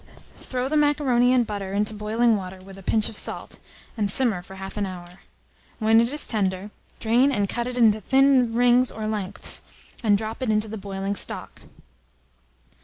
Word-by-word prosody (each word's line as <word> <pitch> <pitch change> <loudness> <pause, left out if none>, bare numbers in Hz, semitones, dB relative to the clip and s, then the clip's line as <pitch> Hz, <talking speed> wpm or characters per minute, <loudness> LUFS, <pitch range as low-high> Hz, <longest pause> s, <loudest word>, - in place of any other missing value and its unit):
Throw 255 0 -3
the 300 - -2
macaroni 280 -5 +3
and 250 -2 +3
butter 200 -2 -5
into 210 +2 0
boiling 220 +2 +1
water, 190 -2 -6
with 190 +1 -13
a 195 - -12
pinch 215 +3 +2
of - - -8
salt, - - -5 0.4
and 210 -3 -1
simmer 220 -4 +1
for 190 +2 -13
1/2 195 +1 -8
an 205 -1 -1
hour. 180 -2 -8 0.7
When 225 0 +4
it 235 +2 0
is 295 +1 +5
tender, 195 -1 -2 0.3
drain 245 +5 +3
and 205 -6 0
cut 235 +4 -2
it 250 0 -5
into 220 -3 +4
thin 265 0 +3
rings 245 +2 +3
or 220 - -6
lengths, 205 -2 -3 0.4
and 205 -3 +4
drop 220 +4 -6
it 255 - -1
into 215 0 +1
the 220 - -6
boiling 195 0 -4
stock. - - -3
220 Hz, 180 wpm, -24 LUFS, 200-245 Hz, 0.7 s, is